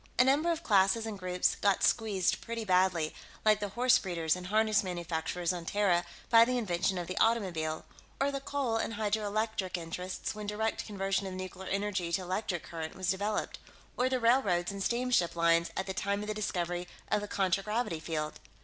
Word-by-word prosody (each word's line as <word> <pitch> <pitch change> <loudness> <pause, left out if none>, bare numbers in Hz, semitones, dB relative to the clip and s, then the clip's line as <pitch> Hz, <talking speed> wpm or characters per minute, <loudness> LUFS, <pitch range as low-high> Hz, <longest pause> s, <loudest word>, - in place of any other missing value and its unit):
A 250 - +7
number 290 +6 +3
of 335 0 -3
classes 200 +2 +3
and 215 -3 -5
groups 180 -1 +1
got 200 -1 +1
squeezed 205 -3 +2
pretty 230 -1 -4
badly, 180 -4 +2 0.3
like 215 -1 +5
the 205 -1 -3
horse 250 +4 +4
breeders 170 -4 0
and 180 0 -7
harness 215 +1 +3
manufacturers 175 -1 -2
on 175 -1 -5
Terra 180 -1 +2 0.3
by 230 -1 +9
the 250 +1 +1
invention 190 -4 0
of 175 - -3
the 185 - -5
automobile, 175 -9 +1 0.3
or 275 +1 +2
the 275 - -3
coal 270 -5 -1
and 225 - -2
hydroelectric 210 -2 -1
interests 180 +2 -4
when 210 -1 -7
direct 220 +2 -2
conversion 195 -1 -1
of 185 - -6
nuclear 185 0 -6
energy 195 -3 -1
to 190 - +1
electric 185 -1 -2
current 160 -1 -6
was 185 -1 0
developed, 205 +2 -2 0.4
or 250 +1 +1
the 260 -1 0
railroads 215 -8 +3
and 200 0 -6
steamship 235 -6 +1
lines 170 0 +3
at 190 - -1
the 190 - -3
time 200 +2 -1
of - - -6
the 215 - -1
discovery 175 -4 -2 0.2
of 210 - +2
the 205 - -5
contragravity 195 0 0
field. 155 -1 -3
195 Hz, 185 wpm, -31 LUFS, 180-220 Hz, 0.4 s, by